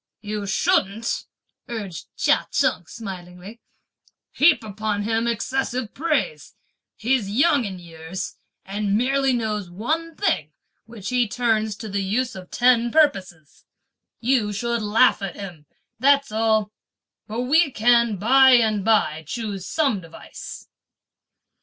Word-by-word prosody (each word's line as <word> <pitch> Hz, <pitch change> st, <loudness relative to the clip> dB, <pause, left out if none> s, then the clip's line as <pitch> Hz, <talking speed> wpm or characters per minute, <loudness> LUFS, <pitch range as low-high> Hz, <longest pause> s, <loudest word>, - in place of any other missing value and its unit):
"You 210 Hz, -1 st, -4 dB
shouldn't," 225 Hz, -, 0 dB, 0.4 s
urged 195 Hz, -9 st, -6 dB
Chia -, -, +2 dB
Cheng 180 Hz, -11 st, 0 dB
smilingly, 190 Hz, 0 st, -9 dB, 0.7 s
"heap 295 Hz, -5 st, +4 dB
upon 210 Hz, 0 st, -3 dB
him 225 Hz, +2 st, 0 dB
excessive 245 Hz, 0 st, -2 dB
praise; 330 Hz, -, -2 dB, 0.4 s
he's 235 Hz, -3 st, 0 dB
young 280 Hz, +4 st, +3 dB
in 190 Hz, -2 st, -5 dB
years, 165 Hz, +1 st, -7 dB, 0.3 s
and 200 Hz, +1 st, -1 dB
merely 270 Hz, +3 st, +2 dB
knows 215 Hz, -6 st, -2 dB
one 315 Hz, -, -3 dB
thing 155 Hz, -, -1 dB, 0.3 s
which 220 Hz, -4 st, -7 dB
he 250 Hz, -2 st, +2 dB
turns 220 Hz, -2 st, 0 dB
to 220 Hz, +2 st, -8 dB
the 200 Hz, -1 st, -2 dB
use 235 Hz, +6 st, -1 dB
of 185 Hz, -1 st, -10 dB
ten 240 Hz, -1 st, +3 dB
purposes; 190 Hz, -, 0 dB, 0.6 s
you 235 Hz, -4 st, +1 dB
should 235 Hz, +3 st, -2 dB
laugh 215 Hz, +2 st, +3 dB
at 195 Hz, -3 st, -4 dB
him, 175 Hz, -7 st, -9 dB, 0.3 s
that's 275 Hz, 0 st, +3 dB
all; 220 Hz, -1 st, +1 dB, 0.6 s
but 225 Hz, +3 st, -3 dB
we 300 Hz, +5 st, +3 dB
can 235 Hz, -2 st, +3 dB
by 260 Hz, +6 st, +6 dB
and 220 Hz, -4 st, +3 dB
by 195 Hz, -8 st, +2 dB
choose 205 Hz, -2 st, -5 dB
some 275 Hz, -11 st, 0 dB
device." 165 Hz, -1 st, -10 dB
220 Hz, 125 wpm, -23 LUFS, 195-250 Hz, 0.7 s, by